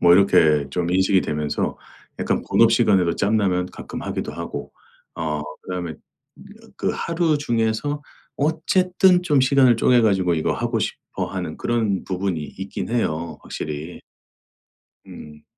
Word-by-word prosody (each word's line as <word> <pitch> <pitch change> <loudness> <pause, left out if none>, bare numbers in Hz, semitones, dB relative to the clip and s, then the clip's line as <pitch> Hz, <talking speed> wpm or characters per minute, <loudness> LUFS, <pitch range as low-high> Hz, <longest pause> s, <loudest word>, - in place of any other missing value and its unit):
뭐 85 0 +6
이렇게 80 -7 +4
좀 85 +3 -1
인식이 95 +1 +3
되면서 75 -1 -2 0.4
약간 - - 0
본업 115 0 +5
시간에도 95 -7 +3
짬나면 100 -4 +1
가끔 - - -7
하기도 - - -4
하고 - - -6 0.4
어 75 -2 -2 0.2
그다음에 90 -3 -5 0.8
그 - - 0
하루 165 -2 0
중에서 120 +3 -1 0.3
어쨌든 180 +4 +2
좀 150 -6 +3
시간을 130 -2 +4
쪼개 125 +1 +4
가지고 95 -5 +2
이거 80 - 0
하고 - - -1
싶어 - - -4
하는 - - -5
그런 110 -5 -1
부분이 95 -2 -2 0.2
있긴 95 +3 -5
해요 85 -9 -2
확실히. 75 +3 -6 1.1
음. 75 0 -12
100 Hz, 280 characters per minute, -22 LUFS, 85-130 Hz, 1.1 s, 뭐